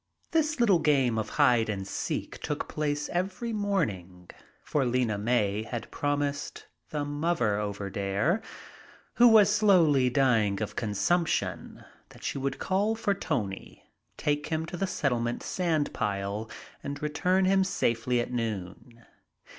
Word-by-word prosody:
This 310 -3 +1
little 205 -7 +4
game 135 -7 +2
of 110 - -3
hide 125 -6 +4
and 95 -2 -3
seek - - -4
took - - -3
place 150 -1 -2
every 195 +6 -2
morning, 95 - -2 0.3
for 145 - 0
Lena 125 -3 +1
May 105 -2 +1
had 115 +1 -6
promised 145 0 -2 0.2
the 150 -1 -2
"muvver 145 -8 0
over 100 -1 -3
dere," 100 - 0 0.8
who 245 - +8
was 210 -3 +6
slowly 170 -11 +4
dying 115 -7 +2
of 105 - -4
consumption, 105 - -1 0.2
that - - -16
she - - -2
would 135 0 -2
call 205 +4 0
for 210 -2 0
Tony, 120 - -4 0.3
take 145 0 -1
him 160 0 -1
to 165 - -7
the 195 +3 -1
Settlement 120 -9 -1
sandpile 110 - -1 0.3
and 145 +1 -5
return 180 +5 +1
him 190 0 +4
safely 120 -8 0
at 120 +1 -3
noon. 115 +1 -5
140 Hz, 135 wpm, -28 LUFS, 110-175 Hz, 0.8 s, who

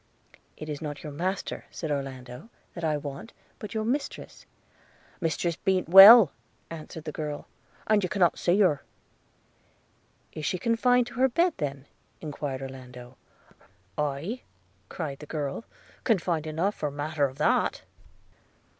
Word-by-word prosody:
'It 155 - -8
is 150 -2 -5
not 145 -2 -6
your 150 - -6
master,' 185 +6 -3
said 160 -3 -5
Orlando, 135 - -5 0.2
'that 170 - -8
I 155 -2 +1
want, 145 +8 -8 0.3
but 210 0 -8
your 220 - 0
mistress.' 275 +5 -4 0.3
– - - -30
'Mistress 165 +1 -1
be'nt 190 -3 0
well,' 195 0 +10 0.4
answered 160 -1 -8
the 155 - -5
girl, 150 -1 -5 0.4
'and 215 -1 +3
you 185 - -2
cannot 175 -5 +3
a - - -20
see 180 +3 +2
her.' 150 -8 +3 1.5
'Is 155 - -7
she 185 - -1
confined 240 +4 +2
to 240 - -11
her 265 +1 +4
bed 340 +8 +2
then?' 140 -4 -4 0.3
enquired 145 -3 -5
Orlando. 125 -1 -10 0.8
'Aye,' 150 - -3 0.5
cried 145 -5 -5
the 150 - -10
girl, 145 +6 -4 0.4
'confined 175 -8 0
enough 165 +6 0
for 150 - -3
matter 145 +1 -1
of 135 0 -5
that.' - - +1
155 Hz, 145 wpm, -27 LUFS, 145-195 Hz, 1.5 s, well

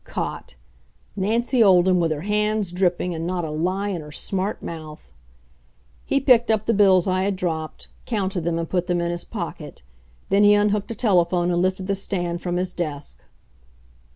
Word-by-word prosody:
Caught! - - -5 0.6
Nancy 230 +5 +2
Olden, 185 -2 +5
with 165 -2 +1
her 150 -1 -2
hands 210 0 0
dripping, 180 -1 0
and 165 0 -4
not 180 -2 -2
a 155 - -5
lie 185 +6 -1
in 180 -5 -3
her 150 0 -11
smart 195 +6 -3
mouth! 155 -2 -8 1.0
He 275 - +2
picked 245 -4 +4
up 215 -1 +1
the 230 - +2
bills 195 -3 +4
I 185 0 +1
had 195 +1 0
dropped, 160 -4 -4 0.2
counted 195 -5 -1
them 170 0 -1
and 165 0 -3
put 180 0 -1
them 175 -2 0
in 170 0 -1
his 175 0 -4
pocket. - - -7 0.5
Then 200 +1 +4
he 205 0 +7
unhooked 205 0 +1
a 230 - -4
telephone 180 -5 +2
and 175 0 +1
lifted 185 +1 -1
the 200 - 0
stand 175 -3 -3
from 175 -1 -2
his 180 0 -2
desk. 150 -4 -5
185 Hz, 180 wpm, -23 LUFS, 175-205 Hz, 1.0 s, he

